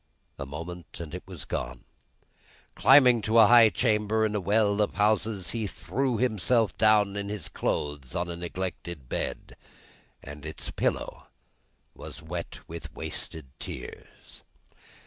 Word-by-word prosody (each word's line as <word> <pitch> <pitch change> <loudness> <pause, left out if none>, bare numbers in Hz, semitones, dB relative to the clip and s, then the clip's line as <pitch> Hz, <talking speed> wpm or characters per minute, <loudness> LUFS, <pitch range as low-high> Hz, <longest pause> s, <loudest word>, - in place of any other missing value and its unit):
A 70 - -5
moment, 85 +4 -8
and 80 -2 -7
it 90 - -5
was 90 -6 -8
gone. - - -4 0.9
Climbing 130 -4 +6
to 110 +2 +1
a 110 - +9
high 115 0 +8
chamber 110 -1 +1
in 105 - -1
a 105 - 0
well 105 +2 +2
of 105 - 0
houses, 105 -1 +1
he 115 -3 -2
threw 130 +5 -2
himself 115 -1 +2
down 105 -2 +4
in 100 0 -3
his 105 -5 -4
clothes 75 -4 -3
on 85 0 -1
a 85 - -5
neglected 85 -4 -5
bed, - - -4 0.7
and 75 +1 -9
its 80 0 -6
pillow - - -2 0.7
was - - -9
wet 85 +2 -7
with 85 0 -8
wasted 80 -3 -6
tears. 65 - -9
100 Hz, 140 wpm, -27 LUFS, 85-110 Hz, 0.9 s, a